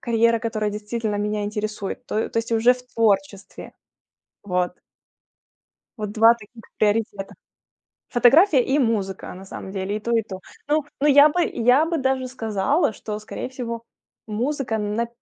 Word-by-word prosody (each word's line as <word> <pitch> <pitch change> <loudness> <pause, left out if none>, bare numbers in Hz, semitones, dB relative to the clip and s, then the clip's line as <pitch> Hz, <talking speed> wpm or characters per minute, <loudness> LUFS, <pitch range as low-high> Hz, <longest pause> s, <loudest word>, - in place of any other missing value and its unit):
карьера, 230 0 +2
которая 215 -2 -2
действительно 210 +1 -3
меня 210 0 -1
интересует, 210 +2 -4
то 215 - -1
то - - -2
есть 230 0 -3
уже 235 +3 +4
в 250 - -13
творчестве 200 -3 -1 0.7
вот. 180 -3 -1 1.3
Вот 210 -1 -4
2 225 +2 +6
таких 225 +1 -15 0.2
приоритета: 210 -2 0 0.7
фотография 270 +5 +5
и 270 +4 +1
музыка, 205 -6 -1
на 185 +1 -11
самом 190 - -8
деле. 195 +1 -3
И - - -5
то, 235 +3 -4
и 225 - +2
то. 190 -3 -8 0.3
Но 305 +1 +2 0.2
но 290 - +2
я 285 +1 +8
бы 355 +3 +1
я 250 +5 +3
бы 335 0 -1
даже 265 -1 0
сказала, 250 - 0
что, 210 0 -6
скорее 215 - -6
всего, 235 -3 -6 0.4
музыка 240 +2 -2
на 210 +3 -2
225 Hz, 155 wpm, -23 LUFS, 210-250 Hz, 1.3 s, я